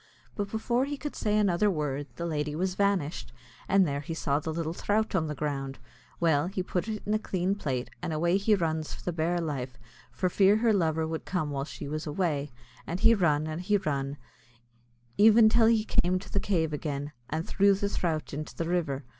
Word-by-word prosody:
But 205 Hz, -1 st, -2 dB
before 235 Hz, +4 st, 0 dB
he 290 Hz, +1 st, -4 dB
could 295 Hz, +1 st, -6 dB
say 210 Hz, -1 st, +1 dB
another 205 Hz, 0 st, +3 dB
word, 145 Hz, -5 st, -2 dB
the 170 Hz, -, -4 dB
lady 150 Hz, -2 st, -2 dB
was 185 Hz, +3 st, -1 dB
vanished, 190 Hz, -10 st, 0 dB, 0.4 s
and 195 Hz, -2 st, +5 dB
there 140 Hz, -1 st, -1 dB
he 160 Hz, +3 st, -5 dB
saw 145 Hz, -2 st, 0 dB
the 160 Hz, +1 st, -4 dB
little 165 Hz, 0 st, -2 dB
throut 215 Hz, +4 st, 0 dB
an 165 Hz, -5 st, +1 dB
the 150 Hz, -, -4 dB
ground. 135 Hz, -2 st, -3 dB, 0.4 s
Well 160 Hz, -2 st, +3 dB
he 185 Hz, 0 st, -3 dB
put 180 Hz, +2 st, -2 dB
it 215 Hz, -1 st, -4 dB
in 210 Hz, -, 0 dB
a 215 Hz, -, +2 dB
clean 185 Hz, -2 st, -1 dB
plate, 135 Hz, -10 st, -3 dB
and -, -, -3 dB
away 170 Hz, +4 st, +2 dB
he 210 Hz, +2 st, +3 dB
runs 160 Hz, -4 st, -2 dB
for -, -, -13 dB
the 180 Hz, -, -2 dB
bare 170 Hz, +2 st, 0 dB
life, 135 Hz, -6 st, -4 dB, 0.3 s
for 185 Hz, -, -1 dB
fear 195 Hz, +3 st, +4 dB
her 225 Hz, 0 st, +3 dB
lover 160 Hz, -4 st, +1 dB
would 160 Hz, 0 st, -4 dB
come 155 Hz, -6 st, -2 dB
while 140 Hz, -1 st, -2 dB
she 145 Hz, -, -7 dB
was 155 Hz, +2 st, -4 dB
away; 150 Hz, -3 st, -1 dB, 0.4 s
and 175 Hz, +4 st, -3 dB
he 230 Hz, 0 st, +7 dB
run, 155 Hz, -7 st, +2 dB
and 155 Hz, +2 st, -4 dB
he 205 Hz, +3 st, +2 dB
run, 140 Hz, -5 st, -2 dB, 1.0 s
even 220 Hz, +1 st, +7 dB
till 225 Hz, 0 st, +5 dB
he 225 Hz, -2 st, +3 dB
came 180 Hz, -3 st, +2 dB
to 185 Hz, -, -9 dB
the 200 Hz, -, +2 dB
cave 165 Hz, -7 st, 0 dB
agin, 145 Hz, -1 st, -3 dB, 0.2 s
and 160 Hz, +2 st, -2 dB
threw 200 Hz, 0 st, +4 dB
the 200 Hz, +1 st, -1 dB
throut 165 Hz, -7 st, -2 dB
into 150 Hz, +2 st, -5 dB
the 165 Hz, -, -2 dB
river. 160 Hz, -6 st, -1 dB
170 Hz, 215 wpm, -28 LUFS, 150-200 Hz, 1.0 s, he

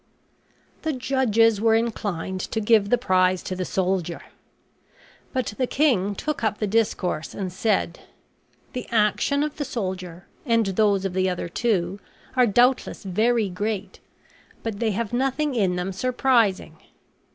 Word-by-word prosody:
The 315 Hz, -1 st, -1 dB
judges 230 Hz, -5 st, +2 dB
were 225 Hz, 0 st, +4 dB
inclined 200 Hz, -5 st, -2 dB
to 225 Hz, -, -1 dB
give 215 Hz, -2 st, +3 dB
the 245 Hz, -, +4 dB
prize 185 Hz, -5 st, +2 dB
to 185 Hz, -, -4 dB
the 185 Hz, 0 st, -3 dB
soldier. 180 Hz, -3 st, -1 dB, 1.1 s
But 255 Hz, -5 st, -2 dB
the 255 Hz, -, +1 dB
king 220 Hz, -10 st, +2 dB
took 305 Hz, 0 st, -3 dB
up 215 Hz, -1 st, +1 dB
the 215 Hz, -, -1 dB
discourse 195 Hz, -6 st, -1 dB
and 185 Hz, -3 st, -4 dB
said: 190 Hz, -3 st, 0 dB, 0.7 s
"The 250 Hz, -2 st, -5 dB
action 230 Hz, +6 st, +2 dB
of 300 Hz, -1 st, -4 dB
the 290 Hz, -, -1 dB
soldier, 185 Hz, -8 st, -5 dB, 0.2 s
and 230 Hz, -4 st, +2 dB
those 195 Hz, 0 st, +2 dB
of 190 Hz, -, -2 dB
the 185 Hz, 0 st, +1 dB
other 180 Hz, -1 st, -3 dB
two, 195 Hz, -1 st, -1 dB, 0.4 s
are 250 Hz, -2 st, +5 dB
doubtless 245 Hz, +4 st, +2 dB
very 220 Hz, +4 st, +1 dB
great, 200 Hz, +1 st, -4 dB, 0.6 s
but 220 Hz, -3 st, -4 dB
they 230 Hz, -, +1 dB
have 215 Hz, +2 st, -2 dB
nothing 270 Hz, +3 st, 0 dB
in 195 Hz, -7 st, +1 dB
them 180 Hz, +2 st, -2 dB
surprising. 230 Hz, -7 st, +1 dB
210 Hz, 145 wpm, -24 LUFS, 185-240 Hz, 1.1 s, are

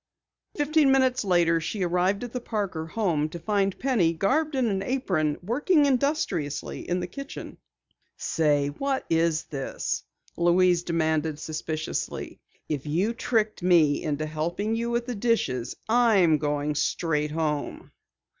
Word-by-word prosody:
Fifteen 295 Hz, -1 st, +3 dB
minutes 260 Hz, -2 st, +3 dB
later 170 Hz, -3 st, +3 dB
she 190 Hz, +4 st, -3 dB
arrived 180 Hz, +4 st, +1 dB
at 245 Hz, -, -7 dB
the 250 Hz, -, -3 dB
Parker 195 Hz, -9 st, -3 dB
home 165 Hz, -6 st, 0 dB
to 170 Hz, -, -7 dB
find 195 Hz, +2 st, 0 dB
Penny, 220 Hz, -11 st, +2 dB
garbed 285 Hz, -, +1 dB
in 260 Hz, -2 st, +2 dB
an 195 Hz, -4 st, 0 dB
apron, 190 Hz, -, 0 dB
working 290 Hz, -, +2 dB
industriously 260 Hz, -, -1 dB
in 180 Hz, +1 st, +1 dB
the -, -, -2 dB
kitchen. 275 Hz, +10 st, -8 dB, 0.6 s
"Say, 145 Hz, -3 st, +1 dB
what 270 Hz, -, -2 dB
is 165 Hz, -1 st, +2 dB
this?" 135 Hz, -3 st, -3 dB, 0.4 s
Louise 175 Hz, 0 st, +4 dB
demanded 160 Hz, -3 st, 0 dB
suspiciously. 155 Hz, 0 st, -4 dB, 0.3 s
"If 150 Hz, -1 st, -3 dB
you 185 Hz, +10 st, +1 dB
tricked 220 Hz, -3 st, 0 dB
me 170 Hz, -5 st, +4 dB
into 155 Hz, 0 st, -2 dB
helping 170 Hz, +8 st, -2 dB
you 235 Hz, +1 st, -2 dB
with 235 Hz, 0 st, -1 dB
the 250 Hz, -, -3 dB
dishes, 200 Hz, -, 0 dB
I'm 215 Hz, -9 st, +4 dB
going 145 Hz, 0 st, -1 dB
straight 150 Hz, 0 st, 0 dB
home!" 150 Hz, -2 st, -3 dB
180 Hz, 135 wpm, -26 LUFS, 155-235 Hz, 0.6 s, Louise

